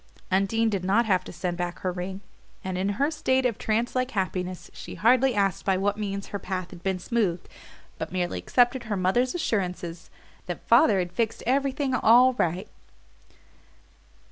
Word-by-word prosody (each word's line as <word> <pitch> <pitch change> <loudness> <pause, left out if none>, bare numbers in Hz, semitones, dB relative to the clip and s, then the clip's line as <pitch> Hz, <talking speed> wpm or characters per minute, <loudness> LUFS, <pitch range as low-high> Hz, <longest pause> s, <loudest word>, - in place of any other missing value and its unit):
Undine 195 +4 +2
did 200 -4 -1
not 205 +6 +3
have 185 -4 +2
to - - -8
send 175 0 -3
back 175 0 -3
her 185 - -1
ring, 185 +2 -5 0.4
and 185 -1 -3
in 190 +2 0
her 285 +3 +1
state 260 -4 +1
of 235 -4 0
trance 225 +2 0
like 255 0 +1
happiness 185 -4 -3
she - - -9
hardly 250 +2 +3
asked 195 -2 +1
by 190 -1 +2
what 200 +2 0
means 200 -2 -4
her 200 - -4
path 185 -2 -4
had 175 - -11
been 190 0 -1
smoothed, 185 -2 -1 0.5
but - - -4
merely 180 -1 -2
accepted 245 0 +2
her 210 -3 -2
mother's 240 - +1
assurance 180 - -3 0.4
that - - -6
"father 225 -12 +6
had 180 -2 -1
fixed 220 +4 -2
everything 270 +1 0
all 250 +1 +6
right." 185 -3 -1
200 Hz, 170 wpm, -26 LUFS, 185-240 Hz, 0.5 s, father